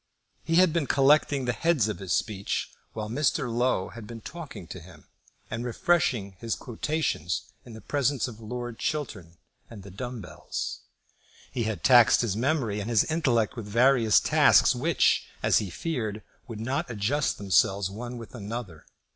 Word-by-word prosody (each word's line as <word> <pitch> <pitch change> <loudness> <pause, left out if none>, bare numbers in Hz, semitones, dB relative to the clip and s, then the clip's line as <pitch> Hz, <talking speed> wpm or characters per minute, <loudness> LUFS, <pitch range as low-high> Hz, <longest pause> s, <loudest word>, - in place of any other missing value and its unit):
He 165 +2 0
had 180 -2 +5
been 165 -5 0
collecting 140 -1 +3
the 125 - 0
heads 165 -6 +2
of 105 - -4
his 95 -3 -6
speech 100 -2 -1 0.2
while 110 -1 -4
Mr. 125 0 0
Low 120 -6 +1
had 115 -3 -10
been 115 0 -8
talking 155 - -8
to 90 +3 -8
him, 85 -3 -15 0.4
and 115 +2 -4
refreshing 120 - 0
his 115 0 -2
quotations 110 - -2 0.2
in 120 - -11
the 110 - -10
presence 140 +1 0
of 115 -3 -10
Lord 120 +1 -6
Chiltern 105 - -4 0.3
and 105 -4 -11
the 100 - -11
dumb 120 +5 -6
bells. 90 - -6 0.7
He 120 - -2
had 110 -2 -3
taxed 120 -3 +6
his 110 -5 -1
memory 120 -4 0
and 105 +3 -4
his 115 -3 +4
intellect 130 -10 +1
with 115 -4 -7
various 115 0 +4
tasks, - - +5
which, - - +2 0.2
as - - +4
he 105 - -4
feared, 110 - -4 0.2
would 115 -4 -7
not 135 +9 -2
adjust 120 +7 0
themselves 95 -1 +2
one 120 +4 -6
with 115 -2 -10
another. 105 -7 -7
115 Hz, 165 wpm, -27 LUFS, 105-135 Hz, 0.7 s, taxed